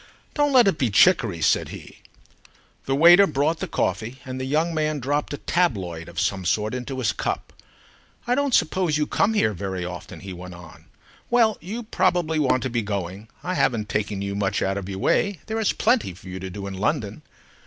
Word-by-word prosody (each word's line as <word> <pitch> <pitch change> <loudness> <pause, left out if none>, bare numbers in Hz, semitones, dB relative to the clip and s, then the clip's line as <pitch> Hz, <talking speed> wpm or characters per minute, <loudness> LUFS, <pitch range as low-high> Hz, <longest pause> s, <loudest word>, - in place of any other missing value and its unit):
"Don't 290 -1 +2
let 250 -5 +6
it 170 -5 +1
be 130 -5 +2
chicory," 110 - +4
said - - +2
he. - - -11 0.9
The 135 - +1
waiter 175 +6 +7
brought 155 +2 0
the - - -3
coffee, 120 +3 -2
and 130 0 -5
the - - -3
young 155 +5 0
man 155 -1 0
dropped 145 +3 -1
a 145 - -3
tabloid 95 - -1
of - - -5
some 95 -1 0
sort 105 +5 0
into 125 +1 -4
his 120 -7 0
cup. - - -3 0.7
"I 240 - +1
don't 280 -1 +2
suppose 160 -1 +1
you 150 - +1
come 220 +8 +1
here 110 - +2
very 95 -1 -4
often," 90 -1 -8
he 95 -1 -7
went 90 0 -9
on. 85 -2 -14 0.4
"Well, 230 -3 +4
you 215 +8 -5
probably 175 -7 +1
want 130 -3 +2
to 130 - -1
be 120 -1 0
going. 100 0 -4 0.2
I 185 - -2
haven't 115 - 0
taken 105 -2 -2
you 100 0 -3
much 100 -1 -1
out 95 0 0
of 95 0 -8
your 95 - -4
way, 200 - +1
there 220 0 -3
is 220 - +2
plenty 230 - +1
for 95 - -15
you 95 +1 -6
to 95 0 -6
do 100 +2 -7
in 100 - -5
London." 110 +3 -2
130 Hz, 205 wpm, -24 LUFS, -, 0.9 s, waiter